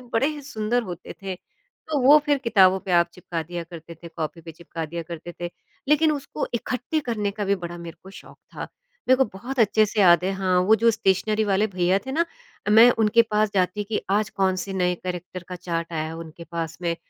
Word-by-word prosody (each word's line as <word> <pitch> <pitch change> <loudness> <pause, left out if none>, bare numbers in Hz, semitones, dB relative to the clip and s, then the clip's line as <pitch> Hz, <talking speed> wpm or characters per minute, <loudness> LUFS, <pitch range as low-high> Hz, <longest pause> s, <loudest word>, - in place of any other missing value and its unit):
बड़े 245 +5 +3
ही 300 -2 -6
सुंदर 245 -3 -1
होते 180 -3 -8
थे 190 -1 -3
तो 315 - -7
वो 295 +2 +9
फिर 290 -1 +3
किताबों 195 -7 +4
पे 185 - -4
आप 170 0 +4
चिपका 170 -2 -5
दिया 175 +1 -6
करते 170 -1 -11
थे, 170 +1 -11
कॉपी 165 0 -5
पे 165 0 -10
चिपका 165 0 -7
दिया 170 +2 -5
करते 170 +1 -8
थे। 175 - -3 0.4
लेकिन 305 +1 +4
उसको 285 -2 -4
इकट्ठे 250 +6 -2
करने 220 -7 -2
का 205 +1 -4
भी 200 0 +2
बड़ा 175 -1 -7
मेरे 170 -1 -9
को 190 - -12
शौक़ - - -14 0.2
था - - -4 0.4
मेरे 260 - +6
को 265 - +4
बहुत 255 +5 -6
अच्छे 215 0 +4
से 210 +1 -1
याद 175 -2 +6
है 195 - 0
हाँ, 185 -1 +1
वो 210 +4 +5
जो 230 +2 +4
स्टेशनरी 215 +1 +1
वाले 205 +1 +2
भैया 185 -1 +1
थे 265 - -4
ना, 335 +3 +2 0.5
मैं 230 +3 +8
उनके 220 +1 +5
पास 215 0 +2
जाती 190 +2 +1
कि 215 +1 -3
आज 205 0 +1
कौन 190 -1 +1
से 195 +1 -4
नए 180 -1 +1
कैरेक्टर 180 0 -5
का 180 - -5
चार्ट 170 -1 -4
आया 155 -1 -1
है 160 +1 -6
उनके 165 0 -9
पास 165 -2 -4
में, 170 -1 0
190 Hz, 225 wpm, -24 LUFS, 175-220 Hz, 0.5 s, वो